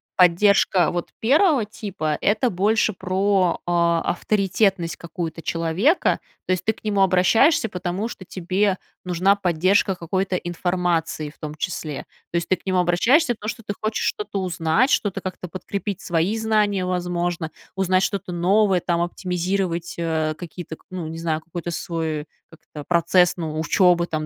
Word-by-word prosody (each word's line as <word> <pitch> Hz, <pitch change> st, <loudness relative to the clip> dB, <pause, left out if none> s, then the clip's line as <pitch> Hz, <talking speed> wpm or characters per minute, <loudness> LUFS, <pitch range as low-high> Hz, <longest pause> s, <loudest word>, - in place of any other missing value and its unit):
поддержка 180 Hz, 0 st, +4 dB
вот 175 Hz, -1 st, -4 dB
1 285 Hz, -, +4 dB
типа- 195 Hz, -8 st, -3 dB
это 215 Hz, +4 st, +2 dB
больше 210 Hz, +4 st, +2 dB
про, 190 Hz, -1 st, +1 dB
а, 170 Hz, -1 st, +2 dB
авторитетность 190 Hz, -2 st, 0 dB
какую-то 165 Hz, -1 st, -6 dB
человека, 170 Hz, -, +1 dB, 0.3 s
то -, -, 0 dB
есть 185 Hz, -1 st, -2 dB
ты 220 Hz, -, +2 dB
к -, -, -22 dB
нему 205 Hz, -2 st, +1 dB
обращаешься, 195 Hz, -, +4 dB
потому 180 Hz, +4 st, -3 dB
что 195 Hz, -5 st, -9 dB
тебе 190 Hz, +2 st, 0 dB, 0.3 s
нужна 180 Hz, +3 st, +3 dB
поддержка 190 Hz, +1 st, +2 dB
какой-то 185 Hz, +2 st, -2 dB
информации, 175 Hz, -3 st, -1 dB
в 145 Hz, -, -19 dB
том 150 Hz, -1 st, -6 dB
числе. 155 Hz, -3 st, -4 dB, 0.3 s
То 170 Hz, -, 0 dB
есть, 170 Hz, -, -2 dB
ты 185 Hz, -, +4 dB
к -, -, -24 dB
нему 185 Hz, -1 st, +1 dB
обращаешься, 235 Hz, -, +3 dB
потому 215 Hz, 0 st, -5 dB
что 225 Hz, -, -6 dB
ты 205 Hz, -1 st, -5 dB
хочешь 215 Hz, 0 st, -1 dB
что-то 205 Hz, -1 st, -3 dB
узнать, 180 Hz, -, +1 dB
что-то 195 Hz, -6 st, 0 dB
как-то 185 Hz, -1 st, -6 dB
подкрепить 195 Hz, +2 st, -5 dB
свои 175 Hz, +5 st, 0 dB
знания, 210 Hz, -3 st, +1 dB
возможно, 175 Hz, -2 st, -2 dB, 0.2 s
узнать 185 Hz, -1 st, +2 dB
что-то 195 Hz, -2 st, -2 dB
новое, 190 Hz, +2 st, +3 dB
там 170 Hz, 0 st, 0 dB
оптимизировать, 180 Hz, 0 st, -2 dB
э, 160 Hz, -2 st, 0 dB
какие-то 165 Hz, 0 st, -8 dB
к -, -, -30 dB
ну, 180 Hz, -3 st, -5 dB
не 165 Hz, 0 st, -6 dB
знаю, 160 Hz, -1 st, -1 dB
какой-то 170 Hz, +1 st, -6 dB
свой 160 Hz, -3 st, -3 dB, 0.2 s
как-то 155 Hz, -2 st, -11 dB
процесс, 175 Hz, +1 st, +4 dB
ну, 155 Hz, -2 st, -3 dB
учебы 175 Hz, +1 st, +3 dB
там, 155 Hz, -1 st, -3 dB
180 Hz, 155 wpm, -22 LUFS, 170-200 Hz, 0.3 s, поддержка